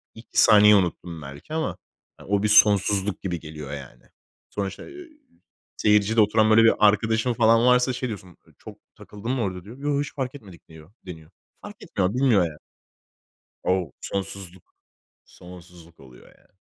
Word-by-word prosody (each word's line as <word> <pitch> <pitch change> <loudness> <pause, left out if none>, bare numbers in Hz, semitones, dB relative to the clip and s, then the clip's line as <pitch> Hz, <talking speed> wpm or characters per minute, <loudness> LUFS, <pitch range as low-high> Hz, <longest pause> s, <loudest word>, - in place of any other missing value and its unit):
2 - - -1
saniye 105 0 +6
unuttum 85 -3 -2
belki 70 - -11
ama 160 0 -3 0.5
o 100 +1 0
bir - - +2
sonsuzluk 105 -1 +3
gibi 90 -4 -4
geliyor 75 -2 -9
yani. 70 -3 -11 0.5
Sonra 100 -1 -3
işte, 95 - -10
iii, 335 -4 -14 0.6
seyircide 105 +1 +2
oturan 110 +1 +3
böyle 115 +1 +6
bir 115 - +5
arkadaşın 110 +3 +2
falan 115 0 +3
varsa, 125 +1 +3
şey 125 +1 -4
diyorsun: 95 -6 -9 0.2
"Çok - - -13 0.2
takıldım 105 +4 -7
mı 130 -3 -2
orada?" 90 -3 -4
diyor. 115 +6 -12
"Yo, 145 0 -1
hiç 145 - -6
fark 135 -1 -4
etmedik." 100 -11 -14
diyor 80 +3 -16
deniyor. 80 -3 -11 0.3
Fark - - -10
etmiyor, 90 +4 -2
bilmiyor 125 -7 +3
yani. 75 -2 -9 1.1
O, 90 -5 -1
sonsuzluk. 95 -2 -7 0.5
Sonsuzluk 90 -2 -16
oluyor 65 -2 -17
yani. - - -26
100 Hz, 155 wpm, -23 LUFS, 90-115 Hz, 1.1 s, saniye